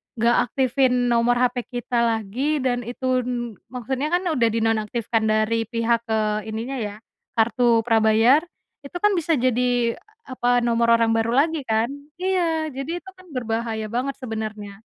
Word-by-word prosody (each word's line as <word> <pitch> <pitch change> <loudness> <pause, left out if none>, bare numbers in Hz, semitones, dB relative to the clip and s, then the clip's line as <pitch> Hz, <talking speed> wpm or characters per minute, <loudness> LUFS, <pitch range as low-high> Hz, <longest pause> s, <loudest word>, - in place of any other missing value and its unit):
nggak 235 +1 +3
aktifin 250 -1 +1
nomor 235 +1 +3
HP 245 0 0
kita 245 -1 -2
lagi, 235 +6 0
dan 245 -1 +1
itu 255 +1 0
n 240 -5 -4
maksudnya 255 +4 -3
kan 350 +3 0
udah 285 -10 +2
dinonaktifkan 225 0 0
dari 215 +1 +1
pihak, 230 0 +1
eee, 215 -1 -1
ininya 230 +5 -4
ya 205 -2 -4 0.4
kartu 235 +1 +3
prabayar, 225 +5 +4 0.4
itu 280 - -10
kan 415 0 +3
bisa 330 -1 0
jadi 245 -1 +1
e - - -18 0.3
apa 245 -1 +1
nomor 235 -1 +2
orang 225 0 +2
baru 225 0 +1
lagi, 315 -1 +1
kan? 220 -1 +1 0.3
Iya, 345 -4 0
jadi 275 +4 -4
itu - - -26
kan 370 0 -17
berbahaya 225 -3 -3
banget 270 +3 -1
sebenarnya. 215 -3 -6
240 Hz, 150 wpm, -23 LUFS, 225-260 Hz, 0.4 s, prabayar